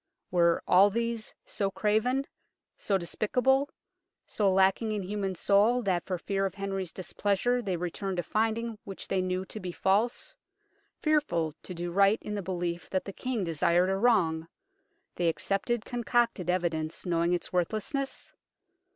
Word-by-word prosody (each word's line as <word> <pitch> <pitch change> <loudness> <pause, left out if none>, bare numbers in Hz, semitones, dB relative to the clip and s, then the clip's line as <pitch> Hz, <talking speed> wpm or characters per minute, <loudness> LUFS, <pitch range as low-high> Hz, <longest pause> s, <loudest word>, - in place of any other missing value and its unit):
Were 170 -1 +3
all 190 +3 +7
these 230 +1 -2
so 200 -1 -1
craven, 220 +7 +1 0.5
so 195 - 0
despicable, 250 - +1 0.6
so 200 -3 +1
lacking 195 +4 +3
in 205 -2 -2
human 195 0 -2
soul 210 +7 +3
that 185 -4 0
for 185 - -1
fear 195 +3 -1
of 190 - -9
Henry's 195 -3 -3
displeasure 205 +6 0
they 190 -6 -2
returned 180 +2 -3
a 175 - 0
finding 225 +2 -1
which 195 -1 -7
they 190 - +1
knew 185 0 -1
to 215 - -8
be 185 -2 -5
false, 200 +7 0 0.6
fearful 230 - +1
to 180 - -8
do 175 +1 -4
right 200 +3 +4
in 210 - -4
the 205 - -2
belief 175 -2 -3
that 185 - -1
the 195 - -6
King 250 -3 -2
desired 175 +2 +2
a - - +1
wrong; 180 -8 +2 0.7
they 175 -1 +2
accepted 200 +7 -1
concocted 235 -6 0
evidence 165 -3 -1
knowing 170 0 +1
its 175 - -3
worthlessness 220 - -1
195 Hz, 150 wpm, -29 LUFS, 180-220 Hz, 0.7 s, all